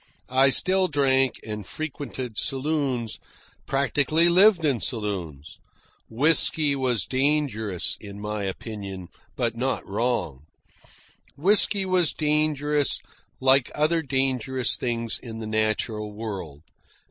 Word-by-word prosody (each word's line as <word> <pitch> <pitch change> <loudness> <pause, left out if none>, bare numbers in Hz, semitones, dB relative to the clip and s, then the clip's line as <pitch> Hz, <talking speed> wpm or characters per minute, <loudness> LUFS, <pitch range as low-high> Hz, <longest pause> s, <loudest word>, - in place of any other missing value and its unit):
I 135 +1 +5
still 185 +7 +4
drank 135 -4 +2
and 105 -1 -5
frequented 135 -2 -6
saloons 135 -4 -1 0.5
practically 145 +4 +2
lived 185 -1 +5
in 135 -6 +1
saloons. 90 - -4 0.5
Whisky 150 +3 +3
was 125 -7 0
dangerous, 130 - 0
in 100 -1 -10
my 105 0 -4
opinion, 95 -2 -6 0.3
but 115 -3 -1
not 130 +2 -2
wrong. 95 - -2 0.9
Whisky 200 +4 +3
was 180 -3 +2
dangerous 150 -2 +1 0.4
like 130 0 +4
other 160 +2 +2
dangerous 130 -2 0
things 115 -2 -2
in 115 -3 -8
the 110 - -6
natural 110 0 -1
world. 95 -9 -7
130 Hz, 105 wpm, -25 LUFS, 110-150 Hz, 0.9 s, I